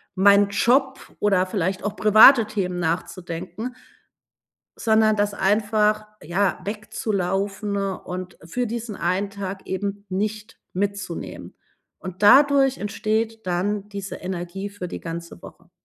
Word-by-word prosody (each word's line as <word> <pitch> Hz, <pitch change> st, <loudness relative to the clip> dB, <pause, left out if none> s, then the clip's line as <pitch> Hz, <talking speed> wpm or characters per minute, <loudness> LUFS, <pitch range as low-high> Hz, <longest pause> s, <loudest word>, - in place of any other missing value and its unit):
meinen 200 Hz, +1 st, +5 dB
Job 265 Hz, +6 st, +2 dB, 0.2 s
oder 195 Hz, -3 st, +2 dB
vielleicht 185 Hz, 0 st, -2 dB
auch 205 Hz, 0 st, -2 dB
private 220 Hz, +3 st, +8 dB
Themen 185 Hz, -4 st, -2 dB
nachzudenken 180 Hz, +6 st, -4 dB, 1.0 s
sondern 220 Hz, -1 st, +3 dB
das 205 Hz, 0 st, 0 dB
einfach, 210 Hz, +1 st, +1 dB, 0.2 s
ja, 180 Hz, +5 st, 0 dB
wegzulaufen 200 Hz, -1 st, -2 dB
und 185 Hz, -2 st, -5 dB
für 245 Hz, +10 st, -2 dB
diesen 230 Hz, -1 st, -5 dB
einen 185 Hz, +4 st, -1 dB
Tag 195 Hz, -1 st, -6 dB
eben 200 Hz, +1 st, -4 dB
nicht 210 Hz, +3 st, -3 dB
mitzunehmen. 195 Hz, -2 st, -4 dB, 0.4 s
Und 185 Hz, 0 st, -9 dB
dadurch 270 Hz, +4 st, +6 dB
entsteht 220 Hz, +1 st, -2 dB
dann 195 Hz, +3 st, -1 dB
diese 200 Hz, -1 st, -6 dB
Energie 185 Hz, +2 st, -5 dB
für 200 Hz, -3 st, -7 dB
die -, -, -6 dB
ganze 170 Hz, 0 st, -7 dB
Woche. 170 Hz, 0 st, -14 dB
200 Hz, 115 wpm, -23 LUFS, 185-215 Hz, 1.0 s, private